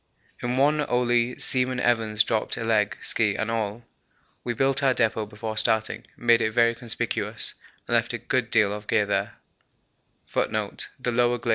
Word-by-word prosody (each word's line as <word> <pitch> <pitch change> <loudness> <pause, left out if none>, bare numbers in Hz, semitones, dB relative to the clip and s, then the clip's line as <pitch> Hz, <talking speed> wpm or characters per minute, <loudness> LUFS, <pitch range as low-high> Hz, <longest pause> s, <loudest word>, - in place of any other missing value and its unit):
In 120 +1 -2
one 150 +2 +3
only 120 0 +1
Seaman 130 -1 +4
Evans 110 -3 +2
dropped 110 -2 -2
a 115 - -4
leg, 110 -2 +1
ski 105 -3 +2
and 110 +1 -2
all. 110 0 -3 0.6
We 120 -1 -3
built 135 +3 +1
our 135 -2 +2
depot 110 -2 0
before 110 +1 -6
starting, 110 0 +1
made 120 -1 +3
it 110 - -1
very 115 0 +3
conspicuous, 115 -2 -2 0.3
and - - -3
left - - +2
a - - -3
good 125 -3 -2
deal 105 -3 +2
of 105 0 -8
gear 105 -2 +2
there. 100 - -2
115 Hz, 150 wpm, -25 LUFS, 110-120 Hz, 0.6 s, Seaman